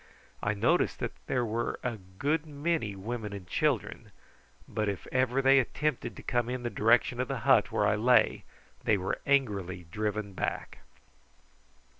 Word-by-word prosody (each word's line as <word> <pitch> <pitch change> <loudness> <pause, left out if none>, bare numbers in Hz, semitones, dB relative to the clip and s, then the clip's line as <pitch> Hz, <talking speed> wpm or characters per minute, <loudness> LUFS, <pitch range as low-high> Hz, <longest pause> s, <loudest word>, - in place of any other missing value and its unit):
I 105 0 0
noticed 100 - +2
that - - -3 0.2
there 125 -2 +1
were 115 +1 -2
a 125 -3 -2
good 140 - -2
many 145 -7 -1
women 105 +1 -5
and 100 -3 -7
children, - - -1 0.6
but 105 -1 -1
if 100 - -4
ever 130 +1 +1
they 135 +1 +6
attempted 150 +2 -1
to - - -11
come 120 -1 0
in 125 0 -3
the 120 - -2
direction 120 +2 +3
of 130 - 0
the - - -3
hut - - +4
where - - +1
I - - +3
lay 120 +4 +3 0.4
they 105 - +3
were 95 0 -3
angrily 100 -10 +1
driven 105 -1 -2
back. - - -4
120 Hz, 160 wpm, -30 LUFS, 105-130 Hz, 0.6 s, they